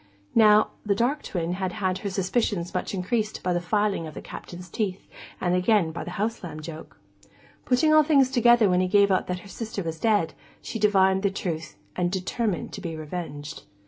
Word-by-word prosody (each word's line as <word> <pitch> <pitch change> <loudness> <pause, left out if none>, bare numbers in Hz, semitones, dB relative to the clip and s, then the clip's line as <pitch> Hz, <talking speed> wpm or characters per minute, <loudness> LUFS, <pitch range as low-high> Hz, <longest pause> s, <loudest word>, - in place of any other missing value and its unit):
Now, 215 -1 +6
the 205 -2 +1
dark 260 +7 +1
twin 170 -2 -3
had 185 -1 -3
had 185 -3 -1
her 200 - -3
suspicions 190 -1 -1
much 180 +2 -2
increased 215 +4 -2
by 180 - +1
the 175 - 0
filing 205 -2 0
of 155 - -10
the - - -6
Captain's 180 0 -9
teeth, 190 +1 -3 0.3
and 175 -1 0
again 180 -2 +3
by 160 - -5
the 165 - -7
house 220 +2 -2
lamb 155 -3 -6
joke. 155 0 -9 0.7
Putting 285 +5 +3
all 310 - +8
things 280 -4 +3
together 240 -3 +5
when 180 -1 +3
he 185 - +1
gave 200 +1 +4
out 185 - +1
that 180 0 -3
her - - -13
sister 220 -1 -5
was 165 -1 -5
dead, 210 -7 +2 0.3
she 225 - -6
divined 190 -2 +4
the 200 - +2
truth, 170 -4 -4 0.2
and 175 -1 0
determined 190 +1 -2
to - - -6
be 165 -2 -4
revenged. 150 -2 -6
190 Hz, 200 wpm, -25 LUFS, 175-215 Hz, 0.7 s, all